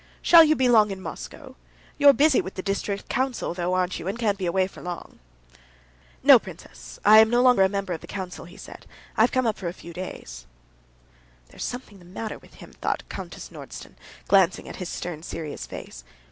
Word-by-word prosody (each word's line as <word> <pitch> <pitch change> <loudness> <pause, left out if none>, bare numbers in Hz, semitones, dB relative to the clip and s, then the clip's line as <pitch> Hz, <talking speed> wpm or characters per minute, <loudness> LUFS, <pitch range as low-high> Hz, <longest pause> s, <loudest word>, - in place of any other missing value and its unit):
"Shall 335 -1 +9
you 310 0 +3
be 260 -3 +2
long 220 -3 +5
in 195 -1 -5
Moscow? 190 - -9 0.4
You're 285 -1 +8
busy 285 0 +3
with 190 - -8
the 185 - -5
district 200 0 -3
council, 255 -6 -2
though, 180 +1 -1
aren't 185 0 -1
you, 165 - -7
and 195 - -3
can't 210 -4 0
be 185 - -2
away 185 +2 +2
for 190 - -11
long?" 175 -1 -8 1.0
"No, - - +9
princess, - - -12
I'm 220 +1 +8
no 240 +1 +2
longer 250 -5 +5
a 190 - +5
member 195 -2 -3
of 160 - -6
the - - -12
council," 185 -3 -6
he 175 +4 -14
said. - - -12 0.3
"I - - +2
have - - +4
come 255 -2 +1
up 220 -2 -1
for 185 - -4
a 170 - -3
few 170 -2 -12
days." 65 - -8 1.0
"There's - - -8
something 245 -5 -6
the 175 - -17
matter 210 +5 -6
with - - -20
him," - - -14
thought - - -2
Countess - - -8
Nordston, - - -10 0.3
glancing 190 -3 +3
at - - -8
his 180 - -5
stern, 170 -3 -5
serious 160 -3 -6
face. - - -9
195 Hz, 205 wpm, -25 LUFS, 180-225 Hz, 1.0 s, Shall